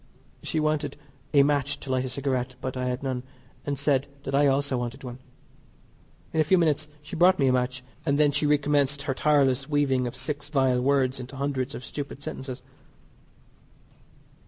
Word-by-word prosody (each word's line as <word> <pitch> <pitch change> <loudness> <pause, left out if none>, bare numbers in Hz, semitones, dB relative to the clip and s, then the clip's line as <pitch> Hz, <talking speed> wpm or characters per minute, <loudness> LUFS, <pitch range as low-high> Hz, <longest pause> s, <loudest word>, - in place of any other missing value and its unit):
She 160 - -2
wanted 155 -2 0 0.3
a 140 -2 +6
match 145 0 +1
to 135 - -5
light 130 0 +1
a - - -3
cigarette, 130 -1 -2
but 130 0 -4
I 125 0 -2
had 125 +1 -2
none, 130 -2 -2 0.5
and 140 -1 -1
said 140 -1 +1 0.2
that 135 - -4
I 145 +1 +5
also 140 0 +1
wanted 120 +3 -5
one. 125 0 -7 1.1
In 160 - +1
a - - +5
few 185 +5 +4
minutes 155 -3 +2 0.2
she 165 +5 -7
brought 180 +3 +5
me 140 - +2
a 130 - +4
match, 125 0 -1 0.2
and 140 -3 +1
then 150 -1 +4
she 145 +1 +1
recommenced 145 -1 +2
her 140 -2 -1
tireless 135 -1 +2
weaving 135 -4 +2
of 120 - -6
six 145 +3 -4
vile 130 -4 +2
words 130 -1 +2
into 130 +2 -8
hundreds 140 -1 -2
of 125 - -7
stupid 145 -1 -6
sentences. 130 -2 -6
140 Hz, 180 wpm, -26 LUFS, 130-145 Hz, 1.1 s, a